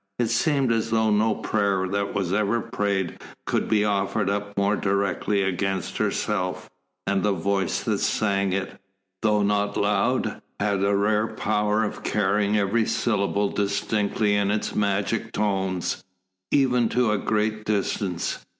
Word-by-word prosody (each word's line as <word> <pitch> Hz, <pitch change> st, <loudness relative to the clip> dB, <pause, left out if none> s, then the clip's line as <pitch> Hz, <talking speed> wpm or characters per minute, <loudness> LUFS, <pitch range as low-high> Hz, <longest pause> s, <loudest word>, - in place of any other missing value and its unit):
It 120 Hz, -2 st, 0 dB
seemed 135 Hz, +1 st, +2 dB
as 115 Hz, 0 st, 0 dB
though 110 Hz, -1 st, +2 dB
no 105 Hz, +1 st, +2 dB
prayer 100 Hz, -3 st, 0 dB
that 100 Hz, +1 st, -2 dB
was 95 Hz, -3 st, -1 dB
ever 105 Hz, +3 st, +1 dB
prayed 100 Hz, -4 st, -2 dB, 0.3 s
could -, -, -1 dB
be 105 Hz, -1 st, +3 dB
offered 100 Hz, 0 st, 0 dB
up 100 Hz, 0 st, -4 dB
more 100 Hz, +1 st, +2 dB
directly 100 Hz, 0 st, 0 dB
against 95 Hz, -1 st, -2 dB
herself, 90 Hz, -3 st, -1 dB, 0.3 s
and 100 Hz, -1 st, +1 dB
the 105 Hz, +1 st, +2 dB
voice 95 Hz, +1 st, -1 dB
that -, -, 0 dB
sang 100 Hz, -2 st, +1 dB
it, 95 Hz, 0 st, -3 dB, 0.4 s
though 105 Hz, -2 st, +2 dB
not 100 Hz, 0 st, 0 dB
loud, 105 Hz, +5 st, +1 dB, 0.2 s
had 100 Hz, -1 st, 0 dB
the 100 Hz, +1 st, +2 dB
rare 105 Hz, +2 st, +2 dB
power 105 Hz, 0 st, 0 dB
of 105 Hz, -, -4 dB
carrying 105 Hz, 0 st, +1 dB
every 105 Hz, +3 st, +1 dB
syllable 100 Hz, -2 st, 0 dB
distinctly 105 Hz, +1 st, 0 dB
in 100 Hz, -1 st, +2 dB
its 105 Hz, +1 st, -1 dB
magic 105 Hz, +3 st, -1 dB
tones, 95 Hz, -3 st, -1 dB, 0.5 s
even 125 Hz, -4 st, +3 dB
to 125 Hz, -3 st, +2 dB
a 105 Hz, -, +1 dB
great 110 Hz, 0 st, 0 dB
distance. 100 Hz, -3 st, -2 dB
105 Hz, 145 wpm, -24 LUFS, 100-110 Hz, 0.5 s, be